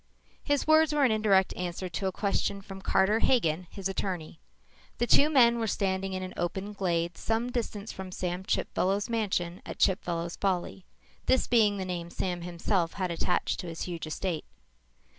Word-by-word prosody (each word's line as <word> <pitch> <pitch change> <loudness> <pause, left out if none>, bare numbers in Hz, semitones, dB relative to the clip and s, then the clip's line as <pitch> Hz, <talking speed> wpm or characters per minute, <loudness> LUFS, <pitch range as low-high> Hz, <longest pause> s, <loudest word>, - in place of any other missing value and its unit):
His 285 -1 +1
words 315 0 +5
were 290 - +3
an 250 - +3
indirect 205 -3 +3
answer 180 +1 -3
to 185 +3 -2
a - - 0
question 200 0 -1
from 195 0 -9
Carter 195 +3 +3
Hagen, 180 -9 +2
his 195 -1 -4
attorney. 180 -5 -4 0.6
The 240 - +1
two 285 +5 +5
men 235 -5 +5
were 225 - 0
standing 190 -1 -1
in 185 0 -3
an 185 - -6
open 190 +4 -3
glade, 175 -3 -1
some 230 +2 -1
distance 220 -3 -3
from 190 -1 -7
Sam 180 0 -3
Chipfellow's 195 +3 0
mansion 185 -6 -1
at - - -7
Chipfellow's 170 -3 0
Folly, 190 -1 -1 0.4
this 260 - +4
being 215 -4 +3
the 190 - -3
name 175 -2 -4
Sam 175 0 -3
himself 170 0 -1
had 185 -3 -2
attached 170 +1 0
to 180 - -5
his 165 -1 -5
huge 170 -3 -5
estate. 165 +1 -3
190 Hz, 175 wpm, -29 LUFS, 175-215 Hz, 0.6 s, words